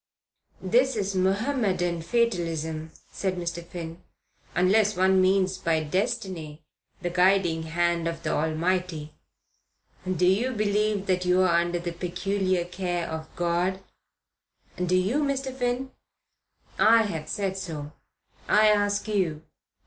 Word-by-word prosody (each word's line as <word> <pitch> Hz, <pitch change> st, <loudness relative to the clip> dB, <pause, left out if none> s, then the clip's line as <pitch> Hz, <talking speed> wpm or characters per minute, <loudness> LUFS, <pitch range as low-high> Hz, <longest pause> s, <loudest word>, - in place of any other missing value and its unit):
"That 250 Hz, +7 st, +3 dB
is 200 Hz, -2 st, -1 dB
Mohammedan 190 Hz, -3 st, 0 dB
fatalism," 165 Hz, -7 st, -1 dB, 0.2 s
said 190 Hz, -2 st, -2 dB
Mr. 170 Hz, -1 st, -4 dB
Finn, 170 Hz, 0 st, -8 dB, 0.5 s
"unless 205 Hz, +3 st, +3 dB
one 190 Hz, 0 st, +4 dB
means 185 Hz, 0 st, +2 dB
by 160 Hz, -1 st, +1 dB
destiny 160 Hz, -2 st, -3 dB, 0.4 s
the 175 Hz, -, -1 dB
guiding 180 Hz, -2 st, +3 dB
hand 170 Hz, +1 st, 0 dB
of 165 Hz, 0 st, -4 dB
the -, -, -1 dB
Almighty. 160 Hz, 0 st, -1 dB, 1.0 s
Do 180 Hz, 0 st, +1 dB
you 220 Hz, +8 st, +2 dB
believe 210 Hz, -1 st, 0 dB
that 185 Hz, -1 st, +1 dB
you're 185 Hz, +1 st, +4 dB
under 175 Hz, 0 st, +2 dB
the 175 Hz, 0 st, -4 dB
peculiar 185 Hz, +1 st, -1 dB
care 175 Hz, -1 st, -3 dB
of 160 Hz, 0 st, -6 dB
God?" 175 Hz, +2 st, 0 dB, 1.0 s
"Do 180 Hz, 0 st, +2 dB
you, 200 Hz, +11 st, +1 dB
Mr. 270 Hz, -2 st, -2 dB
Finn?" 250 Hz, +1 st, -2 dB, 0.9 s
"I 225 Hz, +1 st, +6 dB
have 160 Hz, -7 st, -4 dB
said 195 Hz, -2 st, -2 dB
so. 160 Hz, -6 st, -6 dB, 0.6 s
I 215 Hz, +1 st, +6 dB
ask 205 Hz, 0 st, +1 dB
you. 180 Hz, -7 st, -1 dB
185 Hz, 120 wpm, -26 LUFS, 170-205 Hz, 1.0 s, I